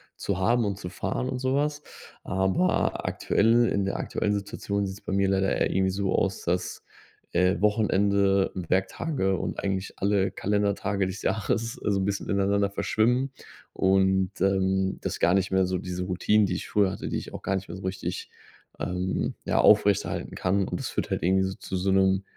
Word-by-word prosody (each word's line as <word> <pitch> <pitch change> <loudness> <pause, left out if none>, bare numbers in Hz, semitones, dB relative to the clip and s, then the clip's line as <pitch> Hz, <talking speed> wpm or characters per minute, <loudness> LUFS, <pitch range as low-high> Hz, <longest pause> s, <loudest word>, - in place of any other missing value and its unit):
zu 95 -2 -3
haben 115 +4 +2
und 100 -1 -2
zu 90 - -6
fahren 125 - -3
und 130 - -2
so 130 +1 -1
was. 145 +1 0 0.4
Aber 95 - 0
aktuelle 115 +3 +3
in 100 -1 0
der 100 - -2
aktuellen 105 - -1
Situation 100 0 -2
sieht 95 +1 -6
es - - -18
bei - - -3
mir 100 0 +2
leider 95 0 +1
eher - - +1
irgendwie 95 0 +1
so 100 0 -1
aus, 95 -1 0
dass, 90 +1 -2 0.5
äh, 90 0 +2
Wochenende, 100 -2 +2
Werktage 95 - 0
und - - -4
eigentlich 95 -1 -2
alle 100 -1 +1
Kalendertage 100 -1 0
des 95 +1 -5
Jahres 110 +2 -1
so 100 -2 -1
'n 95 - 0
bisschen 100 0 -2
ineinander 100 0 +2
verschwimmen 125 +6 +1 0.4
und, 95 0 +2
ähm, 95 0 +1
dass - - -3
gar 85 - +4
nicht 95 0 +1
mehr 95 0 +3
so 95 0 -1
diese 90 0 -4
Routinen, 100 +3 +2
die 95 - -2
ich 90 - -5
früher 100 -3 +2
hatte, 95 - -5
die - - -1
ich - - -7
auch - - -6
gar 95 - -1
nicht 95 0 -4
mehr - - -7
so 95 - -9
richtig, 95 -1 -4 0.5
ähm, 90 +1 -2
ja, - - +1
aufrechterhalten - - +3
kann. 95 +1 +1
Und - - -4
das - - -3
führt - - -3
halt - - -2
irgendwie 95 +1 +1
zu - - -5
so 95 +1 0
'nem 95 0 +3
95 Hz, 190 wpm, -26 LUFS, 95-100 Hz, 0.5 s, gar